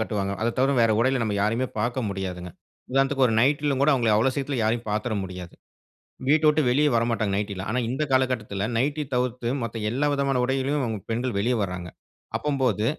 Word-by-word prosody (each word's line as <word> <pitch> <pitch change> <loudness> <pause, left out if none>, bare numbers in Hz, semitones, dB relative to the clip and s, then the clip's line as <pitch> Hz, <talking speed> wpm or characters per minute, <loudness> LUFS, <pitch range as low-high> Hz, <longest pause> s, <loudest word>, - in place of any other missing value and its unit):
கட்டுவாங்க. 100 -3 -2
அத 115 +1 0
தவர 135 +2 +3
வேற 115 -1 +4
உடையில 130 +2 +2
நம்ம 110 -2 -1
யாரையுமே 115 +5 +1
பார்க்க 120 +2 -1
முடியாதுங்க. 90 -2 -5 0.4
உதாரணத்துக்கு 135 0 +3
ஒரு - - 0
நைட்‌ல 145 +2 +2
கூட 145 - +5
அவங்கள 120 -4 +1
அவ்வளோ 120 +5 +3
சீக்கிரத்தில 140 -2 -2
யாரையும் 115 +1 -1
பார்த்துற 105 +2 -1
முடியாது. 90 -2 -8 0.7
வீட்ட 155 +2 +4
வுட்டு 150 0 +3
வெளியே 145 +4 +3
வரமாட்டாங்க 115 -3 0
நைட்டில. 100 -2 -3
ஆனா 125 - 0
இந்த 135 +4 -2
காலகட்டத்தில 120 -6 0
நைட்டி 145 +4 0
தவிர்த்து 125 -1 -1
மத்த 115 0 -4
எல்லா 135 +6 0
விதமான 140 -2 +1
உடையிலும் 135 -2 -1
பெண்கள் 120 0 -1
வெளிய 120 +5 +1
வர்றாங்க. 90 -2 -4 0.5
அப்பம்போது 130 -8 0
120 Hz, 170 wpm, -25 LUFS, 105-135 Hz, 0.7 s, கூட